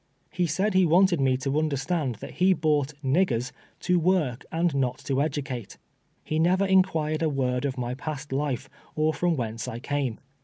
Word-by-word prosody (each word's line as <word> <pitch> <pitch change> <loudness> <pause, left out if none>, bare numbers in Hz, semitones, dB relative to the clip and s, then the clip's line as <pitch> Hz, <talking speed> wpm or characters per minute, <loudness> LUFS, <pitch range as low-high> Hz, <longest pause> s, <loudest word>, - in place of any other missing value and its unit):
lie 175 - +3
said 190 +7 0
lie 190 0 +5
wanted 175 -1 +4
nie 130 -1 +3
to 135 +3 0
understand 145 -2 -1
that 140 - -10
lie 190 +1 +6
bought 150 -3 0
" 150 - -33
niggers" 130 -4 +1 0.3
to 180 -1 +2
work 160 -8 +1
and 170 0 +1
not 130 -2 0
to 140 - -4
cdueate. 140 -5 -3 0.5
Ho 155 - -1
never 185 +4 +3
inquired 165 -5 +2
a 160 - +2
word 130 -2 -1
of 135 -2 -2
my 125 0 -2
past 145 +1 -6
life, 135 -3 -1 0.3
or 155 +1 +2
from 175 0 +1
whence 115 -1 -3
I 120 -2 -4
came. 140 -2 -2
150 Hz, 185 wpm, -26 LUFS, 130-170 Hz, 0.5 s, lie